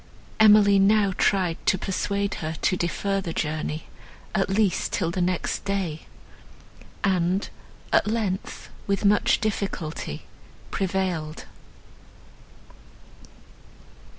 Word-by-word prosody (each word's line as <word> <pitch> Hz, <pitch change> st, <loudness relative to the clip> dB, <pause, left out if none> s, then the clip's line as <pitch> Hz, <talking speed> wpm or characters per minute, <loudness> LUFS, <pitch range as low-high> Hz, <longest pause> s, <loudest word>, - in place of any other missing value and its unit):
Emily 210 Hz, -2 st, +7 dB
now 200 Hz, 0 st, +4 dB
tried 180 Hz, -4 st, +1 dB
to 190 Hz, -, +4 dB
persuade 200 Hz, +2 st, -1 dB
her 160 Hz, 0 st, -3 dB
to 185 Hz, -, +3 dB
defer 195 Hz, +3 st, -1 dB
the 170 Hz, -3 st, -5 dB
journey, 155 Hz, 0 st, -2 dB, 0.5 s
at 195 Hz, -2 st, +1 dB
least 195 Hz, -2 st, +1 dB
till 170 Hz, -4 st, 0 dB
the 180 Hz, -, -2 dB
next 180 Hz, 0 st, -1 dB
day, 190 Hz, -6 st, -3 dB, 1.0 s
and, 185 Hz, 0 st, +1 dB, 0.5 s
at -, -, +4 dB
length, 210 Hz, -4 st, -3 dB, 0.2 s
with 200 Hz, +1 st, 0 dB
much 205 Hz, +1 st, +4 dB
difficulty, 185 Hz, -, -3 dB, 0.5 s
prevailed. 180 Hz, -5 st, -2 dB
190 Hz, 95 wpm, -25 LUFS, 170-200 Hz, 1.0 s, Emily